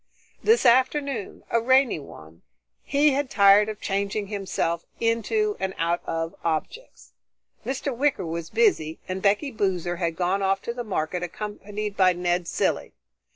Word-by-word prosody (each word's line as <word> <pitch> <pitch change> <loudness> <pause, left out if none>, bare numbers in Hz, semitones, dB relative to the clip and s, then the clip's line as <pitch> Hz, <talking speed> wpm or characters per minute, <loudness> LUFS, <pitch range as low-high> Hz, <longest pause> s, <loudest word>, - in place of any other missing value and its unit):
This 450 - +4
afternoon, 260 -2 +2
a 230 - +2
rainy 260 - +3
one, 80 - -13 0.4
he 290 +1 +3
had 275 0 -1
tired 200 +1 +5
of 215 -1 -6
changing 200 +1 -2
himself 190 -5 -2 0.2
into 410 - +1
and 190 0 -3
out 170 +1 0
of 165 0 -2
objects. 170 - -4 0.5
Mr. 265 0 -3
Wicker 280 -5 +1
was 165 0 -4
busy, 350 - +2
and 185 +1 -4
Becky 210 +9 +2
Boozer 180 -5 -1
had 170 -2 -1
gone 185 +3 0
off 195 0 +1
to 240 +1 -4
market 180 -4 -2
accompanied 210 +2 -5
by 185 -2 +4
Ned 175 0 -1
Cilley. - - -1
200 Hz, 145 wpm, -25 LUFS, 175-255 Hz, 0.5 s, tired